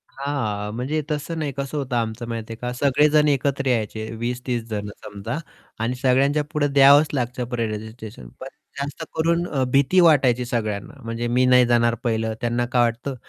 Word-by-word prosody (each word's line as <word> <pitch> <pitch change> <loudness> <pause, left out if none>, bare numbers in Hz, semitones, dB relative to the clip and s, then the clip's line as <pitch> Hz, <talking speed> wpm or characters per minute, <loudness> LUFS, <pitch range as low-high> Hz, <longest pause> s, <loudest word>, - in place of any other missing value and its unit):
हां, 110 -8 -3
म्हणजे 140 +6 -1
तसं 150 +3 -3
नाही, 150 -2 -2
कसं 140 +2 -3
होतं 135 -3 -3
आमचं 115 0 -2
माहिती 115 -1 -5
आहे - - -10
का? 125 0 -3
सगळेजण 150 +3 +3
एकत्र 140 -1 0
यायचे 110 -2 -1
20-30 120 0 -2
जण 105 -1 -4
समजा 100 +7 -5 0.4
आणि 115 +3 -1
सगळ्यांच्या 135 +4 +2
पुढं 145 -2 0
द्यावंच 140 +2 +7
लागतं 125 -2 -2
प्रेझेंटेशन 110 - -5
पण - - -7 0.3
जास्त 145 +3 -4
करून 170 +2 +1
अ, 135 -3 0
भीती 140 +7 +4
वाटायची 135 -8 +4
सगळ्यांना. 110 -4 -3
म्हणजे, 115 +1 -3
"मी 125 +2 +2
नाही 125 -1 +6
जाणार 120 -1 +3
पहिलं", 110 -2 0
त्यांना 120 0 0
काय 125 -1 +3
वाटतं, 120 +3 -2
125 Hz, 165 wpm, -22 LUFS, 115-140 Hz, 0.4 s, द्यावंच